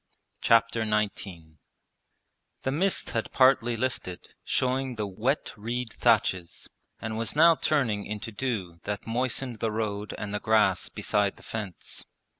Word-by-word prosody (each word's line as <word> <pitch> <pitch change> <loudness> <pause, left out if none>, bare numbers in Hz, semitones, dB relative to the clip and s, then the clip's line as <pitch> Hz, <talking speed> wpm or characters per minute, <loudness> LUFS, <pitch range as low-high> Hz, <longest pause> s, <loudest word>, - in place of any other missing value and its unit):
Chapter 115 0 +4
XIX 100 -7 -2 1.0
The 130 - 0
mist 185 +7 +1
had 115 - -2
partly 120 -3 +4
lifted, 110 -7 -3
showing 130 0 0
the 105 -2 -2
wet 110 +9 -1
reed 115 +2 -3
thatches, 105 -7 +1 0.3
and 110 0 -4
was 115 +3 -1
now 165 +2 +7
turning 120 -11 0
into 105 +2 -5
dew 100 -7 -3
that 105 -1 -3
moistened 125 0 -1
the 115 - 0
road 105 -1 -3
and 105 -1 -5
the 105 - -1
grass 105 -5 +3
beside 100 -1 0
the - - -16
fence. 105 -6 -5
110 Hz, 135 wpm, -28 LUFS, 105-125 Hz, 1.0 s, now